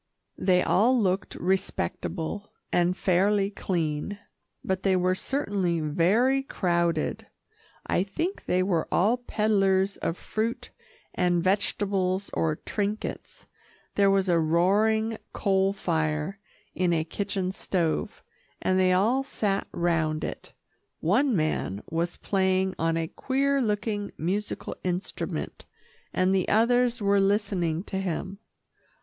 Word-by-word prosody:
They 180 -1 +3
all 245 +5 +3
looked 190 -2 0
respectable 190 0 -2 0.2
and 175 +1 +2
fairly 195 +2 +2
clean, 170 0 -2 0.5
but 190 0 -1
they 195 -1 +2
were 185 0 +2
certainly 195 - -1
very 195 - +2
crowded. 170 -9 -1 0.6
I - - +1
think 325 - -3
they 185 +1 +2
were 175 -4 0
all 215 +7 +3
peddlers 200 -4 +1
of 165 - -2
fruit 235 +3 -3 0.4
and 175 -1 +1
vegetables 195 0 0
or 160 -2 +1
trinkets. 210 +5 -4 0.5
There 200 -1 +4
was 195 -1 +2
a 170 -2 +3
roaring 210 +7 +2
coal 195 -1 +2
fire 160 -1 -1 0.3
in 180 -1 +1
a 160 -1 +1
kitchen 190 +2 -2
stove, 170 - -2 0.4
and 185 0 +1
they 185 -1 +4
all 225 +9 +3
sat 205 -7 -1
round 160 -3 0
it. - - -6 0.5
One 235 - +2
man 155 - -1
was 170 +1 -1
playing 190 -1 +1
on 165 0 +1
a 165 -1 -1
queer 275 +7 0
looking 210 -2 -1
musical 195 +6 -3
instrument, 180 +1 -3 0.5
and 185 +1 +2
the 190 -2 +1
others 240 +1 +3
were 200 0 +4
listening 195 -5 +1
to 190 -2 -4
him. 190 +1 -3
190 Hz, 120 wpm, -27 LUFS, 175-210 Hz, 0.6 s, There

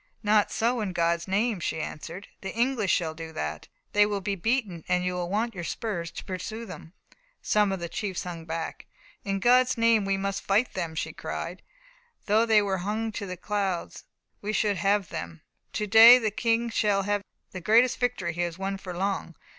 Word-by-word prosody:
"Not 210 0 +3
so, 235 +1 0
in 195 -3 -3
God's 170 0 +1
name!" 205 +2 +1
she 160 - -2
answered. 170 +5 -6
"The 195 - -4
English 235 -5 +1
shall 160 -3 +1
do 160 0 -8
that. 75 - -4 0.3
They 205 - +6
will 205 -1 -1
be 200 +1 -2
beaten, 200 -4 -1
and 180 0 +1
you 180 - 0
will 175 -1 -3
want 225 +4 0
your 175 -3 -6
spurs 170 -3 -3
to - - -8
pursue 215 +5 -5
them." 180 -4 -10 0.5
Some 210 -2 +3
of 190 - -2
the 170 - -4
chiefs 190 +1 -3
hung 170 -2 -7
back. 165 0 -5 0.4
"In 195 -1 -1
God's 250 +4 +4
name, 230 -2 +4
we 195 0 0
must 195 0 -2
fight 210 +6 +1
them!" 170 -4 -3
she - - -3
cried. - - -5 0.6
"Though 220 +3 +3
they 215 -2 +5
were 190 -2 -1
hung 215 +4 -2
to 205 -1 -5
the 180 0 -5
clouds, 195 -2 -3 0.4
we 210 +1 -3
should 205 -1 +1
have 200 -2 +1
them. 80 0 -7 0.3
To 210 - -1
day 225 +4 +10
the 220 -4 -1
King 235 0 0
shall 205 -3 +2
have 205 0 0 0.3
the 185 - -7
greatest 230 +6 +4
victory 230 -9 -1
he 175 - -3
has 175 -1 -2
won 195 +1 -3
for 180 -3 -7
long. 190 -3 -2
195 Hz, 200 wpm, -27 LUFS, 175-220 Hz, 0.6 s, day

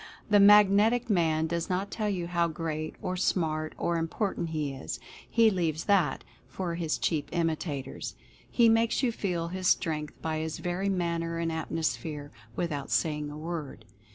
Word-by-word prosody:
The 205 - +7
Magnetic 210 +4 +6
Man 160 -4 +2
does 170 +1 -2
not 190 +2 -1
tell 215 -2 -1
you 180 -4 -2
how 170 0 +1
great, 155 -1 -4
or 185 - -1
smart, 155 -4 0
or 170 0 0
important 170 +1 -2
he 150 -3 -2
is 135 - -6 0.2
— - - -19
he 225 -1 +7
leaves 165 -4 -1
that 185 -9 +2 0.2
for 180 -3 -4
his 165 -2 -1
cheap 155 -4 -1
imitators; 155 -5 -2 0.3
he 235 -2 +4
makes 225 +3 +3
you 245 - +3
feel 175 -6 -2
his 185 +1 -2
strength 150 -4 0
by 160 -1 -2
his 160 0 -3
very 180 +3 -2
manner 170 -3 -1
and 165 0 -1
atmosphere, 160 -2 -3 0.2
without 150 -5 -2
saying 150 -2 0
a 150 - -8
word. 155 -7 -6
170 Hz, 165 wpm, -29 LUFS, 155-190 Hz, 0.3 s, The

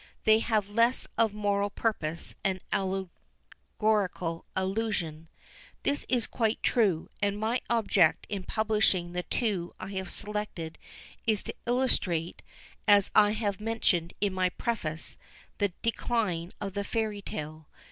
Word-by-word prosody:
They 220 -1 +6
have 215 -3 +1
less 230 +4 +3
of 225 -2 +3
moral 205 -1 0
purpose 170 -7 -2
and 190 -1 +1
allegorical 190 -1 -2
allusion." 190 -5 -1 0.6
This 285 - 0
is 245 -3 +3
quite 225 -1 0
true; 200 -10 +2
and 205 0 +1
my 225 +4 0
object 200 -8 +3
in 200 -2 -3
publishing 210 -4 +1
the 180 0 -2
two 185 -1 -1
I 185 - -6
have 190 -2 -3
selected 210 -6 -3 0.5
is 215 -3 +2
to - - -5
illustrate, 195 -10 +1 0.5
as 205 -2 +6
I 210 -1 +6
have 210 -2 -2
mentioned 210 -7 0
in 200 -2 +1
my 185 -1 +2
preface, 170 -8 -3 0.4
the 205 -2 +2
decline 210 -7 0
of 195 -2 -4
the 200 0 -1
Fairy 215 -1 -1
tale. 155 -3 -6
205 Hz, 130 wpm, -29 LUFS, 180-220 Hz, 0.6 s, They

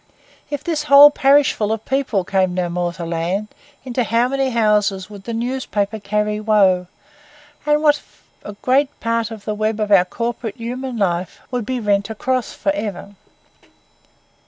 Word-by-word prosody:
If 290 -1 -4
this 310 -3 -2
whole 285 0 +9
parishful 275 -7 +3
of 220 0 -3
people 265 -8 0
came 185 -1 0
no 180 -1 -1
more 175 0 -2
to 170 -1 -6
land, 170 +5 -2 0.3
into 250 -1 -1
how 230 +2 +1
many 270 0 0
houses 210 -4 +1
would 200 -2 -11
the 235 - -4
newspaper 225 -4 -2
carry 210 +1 -1
woe, 195 -4 +3 0.8
and 300 +1 +2
what 295 -1 +4 0.4
a 205 - -7
great 270 +2 +1
part 230 -1 -1
of 220 -3 -10
the 215 - -2
web 215 +1 -1
of 210 -1 -1
our 185 -3 +6
corporate 230 +2 -4
human 250 +2 -5
life 180 -3 -1
would 245 -4 -3
be 255 -1 -2
rent 205 -2 0
across 250 +2 -2
for 195 - -1
ever! 200 -1 -5
215 Hz, 160 wpm, -19 LUFS, 200-255 Hz, 0.8 s, whole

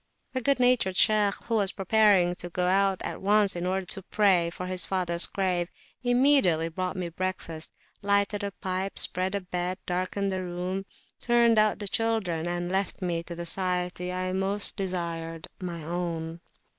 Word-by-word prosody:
The 260 - -1
good 275 +2 +2
natured 245 -7 +3
Shaykh, 210 -2 +4
who 235 - -4
was 200 -4 +3
preparing 195 -3 +4
to 175 - -6
go 180 +1 -1
out 195 +1 +2
at - - -5
once 205 0 +3
in 175 +1 -2
order 190 0 -1
to 195 +2 -1
pray 190 -3 +3
before 170 +2 -6
his 185 -1 +1
father's 175 -2 +1
grave, 180 -3 -1 0.3
immediately 245 - +3
brought 185 +3 -3
me 180 -2 -3
breakfast; 170 -2 -4 0.3
lighted 200 0 +1
a 200 - -1
pipe, 190 0 -4
spread 185 +2 +2
a 200 - -1
bed, 180 0 -3
darkened 185 +2 -1
the 185 0 -2
room, 180 +2 -4 0.3
turned 235 -2 +4
out 215 0 +3
the 205 - -5
children, 195 -7 0
and 175 0 -2
left 190 0 -1
me 170 -2 -1
to 170 0 -8
the 170 0 -5
society 180 0 -1
I 185 0 -2
most 195 +2 -1
desired 170 -3 -4
my 170 -3 -5
own. 165 0 -4
185 Hz, 170 wpm, -27 LUFS, 175-200 Hz, 0.3 s, Shaykh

